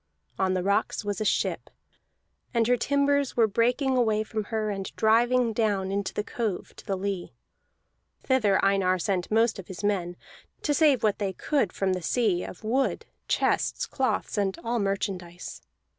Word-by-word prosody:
On 185 -1 +2
the 180 - -1
rocks 200 +1 0
was 205 +1 -2
a - - 0
ship, - - 0 0.9
and 230 -1 +3
her 245 +2 +4
timbers 280 +2 +1
were 230 - +6
breaking 245 +5 +1
away 220 -3 +2
from 215 -1 -4
her 215 -1 -2
and 195 -1 -4
driving 235 +2 +3
down 205 -4 0
into 200 0 -1
the 210 - -2
cove 215 -4 -4
to - - -12
the 195 - 0
lee. 190 -1 -4 0.9
Thither 220 -7 +3
Einar 195 -2 +3
sent 185 -1 -1
most 225 0 +2
of 185 - -9
his 190 +2 -8
men, 185 -4 0 0.5
to 295 - +1
save 290 -6 +4
what 210 -1 +2
they 195 -2 -1
could 275 - 0
from 190 -1 0
the 185 - -3
sea, 190 -1 +1
of 185 - -9
wood, 255 +5 0 0.2
chests, - - +1
cloths, 260 -5 -1
and 195 -2 0
all 235 0 -1
merchandise. 190 -3 -3
210 Hz, 170 wpm, -27 LUFS, 195-240 Hz, 0.9 s, were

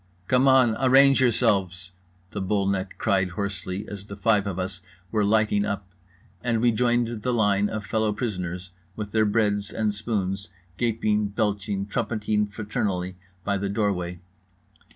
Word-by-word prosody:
"Come 130 +2 +4
on! 130 -4 +5
Arrange 135 +1 +6
yourselves!" 95 -7 +1 0.4
the - - -4
bull 100 +1 0
neck 95 -1 -1
cried 95 -3 +1
hoarsely 100 +1 -4
as 100 -2 -7
the 100 - -8
five 105 -1 +2
of 95 -3 -3
us 95 0 -4 0.3
were 110 -2 +2
lighting 105 0 +2
up; 100 -2 -3 0.6
and 115 -2 +1
we 120 +1 +4
joined 120 -1 +1
the 125 - 0
line 105 -3 +2
of 105 -1 -4
fellow 110 -1 +1
prisoners 90 -5 -4 0.2
with 105 -1 -5
their 110 0 +3
breads 105 -1 +1
and 110 -2 -1
spoons, 100 -3 -2 0.3
gaping, 110 -3 +1
belching, 100 -1 -1
trumpeting 105 0 -1
fraternally, 100 -3 -3 0.3
by 100 0 0
the 100 0 -2
doorway. 95 -4 -1
105 Hz, 150 wpm, -25 LUFS, 100-110 Hz, 0.6 s, Arrange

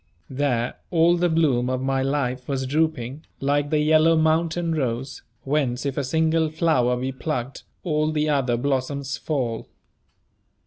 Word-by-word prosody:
There 130 -3 -1
all 170 0 +4
the 175 0 +1
bloom 140 -7 +2
of 130 0 -1
my 135 0 0
life 130 -2 -1
was 135 -2 -2
drooping, 145 -1 -1 0.2
like 145 +1 0
the 155 - +2
yellow 155 +2 +4
mountain 160 +1 +1
rose, 130 -3 -3 0.2
whence 135 -3 -1
if 140 -1 -2
a 140 - -1
single 160 +3 +1
flower 150 -6 +1
be 130 +2 -2
plucked, 130 -1 -4 0.2
all 155 -2 0
the 155 0 0
other 135 -5 +1
blossoms 135 +1 -2
fall. 125 -7 -3
145 Hz, 145 wpm, -23 LUFS, 130-160 Hz, 0.2 s, all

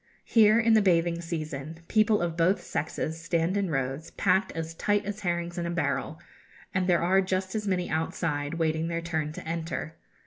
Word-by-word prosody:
Here, 220 -1 +5
in 230 -1 +4
the 220 - +6
bathing 170 -3 +2
season, 160 -2 -5
people 215 -3 +3
of 170 -1 -2
both 175 +4 +3
sexes 160 +2 -3
stand 170 +2 0
in 200 -3 0
rows, 135 +2 -2
packed 190 +1 +1
as 165 0 -4
tight 205 +4 0
as 205 +1 -4
herrings 175 -2 -2
in 170 - -2
a - - -2
barrel, 170 -1 -1 0.5
and 185 -2 +1
there 175 -2 +3
are 190 +3 +4
just 185 0 -2
as 210 -2 -2
many 180 -2 0
outside 160 -1 -2
waiting 160 0 0
their 170 0 -2
turn 160 -3 -2
to - - -8
enter. 165 -1 -3
170 Hz, 185 wpm, -28 LUFS, 160-190 Hz, 0.5 s, the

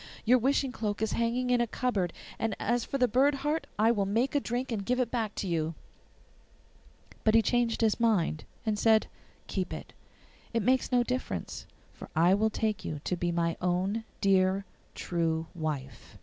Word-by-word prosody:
Your 250 +3 +5
wishing 270 +2 +1
cloak 210 -3 -2
is 220 - 0
hanging 245 +2 0
in 245 -1 +4
a 240 - +1
cupboard, 210 -7 -1 0.3
and 225 -2 -1
as 240 +2 +1
for 275 - -3
the 250 -1 +3
bird 270 +5 +3
heart 305 +2 0
I 220 +2 +4
will 200 -4 0
make 230 +7 +1
a 290 - +3
drink 250 0 -3
and 210 -3 -2
give 250 +5 0
it 245 -2 0
back 225 -4 -2
to 195 - -3
you.' 165 -2 -1 1.5
But 220 0 +4
he 225 - +6
changed 240 -1 +1
his 220 0 +2
mind, 195 -9 +1 0.2
and 215 -2 0
said, 220 -1 +4 0.4
'Keep - - -3
it; - - -8 0.6
it 230 - +2
makes 255 +3 +2
no 245 -1 +4
difference, 255 +1 -4 0.3
for - - -11
I 170 +4 +5
will 215 +2 +3
take 215 -1 -1
you 150 - -4
to 180 - -1
be 175 0 -1
my 170 -1 0
own 185 +5 0 0.2
dear 195 0 +3 0.3
true 165 -2 -1
wife. 150 -6 -5
220 Hz, 185 wpm, -29 LUFS, 185-245 Hz, 1.5 s, he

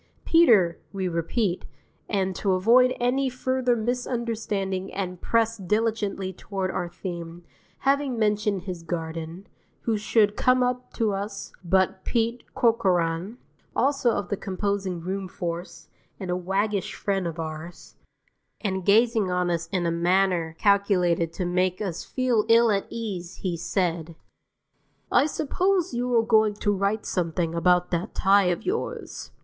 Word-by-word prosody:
Peter, 220 - +5
we 195 -2 -2
repeat, 175 +3 -1 0.5
and 190 -3 0
to 195 -2 +1
avoid 245 +7 +4
any 260 +2 +1
further 255 -1 0
misunderstanding 225 -5 -2
and 180 -2 -4
press 230 0 +1
diligently 205 -1 -1
toward 190 0 -4
our 175 - -3
theme, 170 -1 -7 0.4
having 275 -2 +1
mentioned 210 -3 +1
his 180 -3 -6
garden, 165 +1 -5 0.4
who 225 -2 0
should 210 -1 +2
come 255 0 +3
up 250 0 -2
to 220 -4 0
us 200 +1 -5
but 190 +1 +1
Pete 235 0 0
Corcoran, 185 -3 +1 0.4
also 275 -3 +2
of 205 -5 -1
the 205 - -1
composing 195 -2 -2
room 190 +2 -3
force, 175 0 -6 0.3
and 185 -2 -4
a - - +1
waggish 195 +2 -1
friend 195 -3 -1
of 165 0 -5
ours, 160 +1 -7 0.7
and 190 -3 -2
gazing 220 0 +3
on 180 -1 0
us 165 -1 -2
in 180 -2 0
a 170 - +1
manner 175 -1 +1
calculated 185 -5 +2
to 180 +2 -3
make 180 +1 0
us 185 -6 -3
feel 250 -4 +1
ill 230 0 +6
at 195 -1 0
ease 190 -6 -5
he 180 -3 -1
said, 170 -1 -2 1.0
"I 290 - +4
suppose 360 +4 0
you 245 +1 -1
are 225 - +4
going 220 -2 +3
to 205 0 0
write 200 +3 -1
something 170 -2 -1
about 180 +1 +2
that 175 +4 -2
tie 195 0 +4
of 175 -1 -1
yours." 405 +5 -4
195 Hz, 145 wpm, -25 LUFS, 175-225 Hz, 1.0 s, ill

